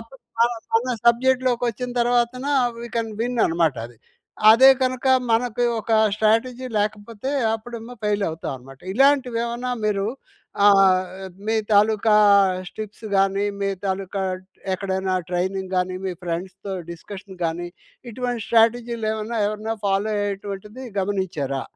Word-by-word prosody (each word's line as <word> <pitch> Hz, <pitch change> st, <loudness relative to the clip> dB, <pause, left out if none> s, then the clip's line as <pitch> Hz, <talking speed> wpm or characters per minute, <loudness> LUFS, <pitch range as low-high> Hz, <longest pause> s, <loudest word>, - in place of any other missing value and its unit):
అప్పుడు 230 Hz, +4 st, -15 dB, 0.2 s
మన 235 Hz, -, +6 dB, 0.3 s
మన 250 Hz, +2 st, +2 dB
సబ్జెక్ట్‌లోకి 255 Hz, 0 st, +3 dB
వచ్చిన 250 Hz, +2 st, -4 dB
తర్వాతన 240 Hz, +1 st, +1 dB, 0.4 s
వీ 235 Hz, -, -6 dB
కెన్ 225 Hz, -1 st, -2 dB
విన్ 245 Hz, +1 st, -1 dB
అన్నమాట. 165 Hz, -5 st, +1 dB
అది. 120 Hz, -, -18 dB, 0.5 s
అదే 260 Hz, +5 st, +8 dB
కనుక 255 Hz, 0 st, -1 dB, 0.2 s
మనకు 240 Hz, +1 st, +1 dB, 0.2 s
ఒక 225 Hz, +2 st, -3 dB, 0.2 s
స్ట్రాటజీ 235 Hz, +4 st, +1 dB
లేకపోతే, 215 Hz, +4 st, -3 dB, 0.2 s
అప్పుడేమో 235 Hz, +1 st, -8 dB
ఫెయిల్ 205 Hz, -1 st, +1 dB
అవుతామన్నమాట. 135 Hz, -4 st, -7 dB
ఇలాంటివి 265 Hz, -2 st, +3 dB
ఏమన్నా 240 Hz, +1 st, -3 dB
మీరు 200 Hz, -1 st, 0 dB, 0.6 s
ఆహ్, 195 Hz, -2 st, +6 dB, 0.5 s
మీ 225 Hz, 0 st, +1 dB, 0.2 s
తాలూకా 215 Hz, +1 st, +4 dB, 0.5 s
స్ -, -, -21 dB
టిప్స్‌గాని 200 Hz, -2 st, -1 dB, 0.2 s
మీ 200 Hz, -, 0 dB, 0.2 s
తాలూకా 195 Hz, 0 st, -2 dB, 0.2 s
డ్ -, -, -24 dB, 0.3 s
ఎక్కడైనా 190 Hz, -1 st, -2 dB, 0.2 s
ట్రైనింగ్‌గాని 185 Hz, 0 st, -1 dB
మీ 185 Hz, -, -2 dB
ఫ్రెండ్స్‌తో 185 Hz, +3 st, -5 dB, 0.2 s
డిస్కషన్‌గాని 175 Hz, -2 st, -5 dB, 0.4 s
ఇటువంటి 245 Hz, -1 st, -3 dB
స్ట్రాటజీలు 230 Hz, 0 st, +2 dB
ఏమైనా, 220 Hz, +2 st, -3 dB
ఎవరైనా 215 Hz, +1 st, -3 dB
ఫాలో 200 Hz, +2 st, +1 dB
అయ్యేటువంటిది 205 Hz, +4 st, -5 dB, 0.2 s
గమనించారా? 175 Hz, -9 st, -2 dB
215 Hz, 120 wpm, -22 LUFS, 190-235 Hz, 0.6 s, అదే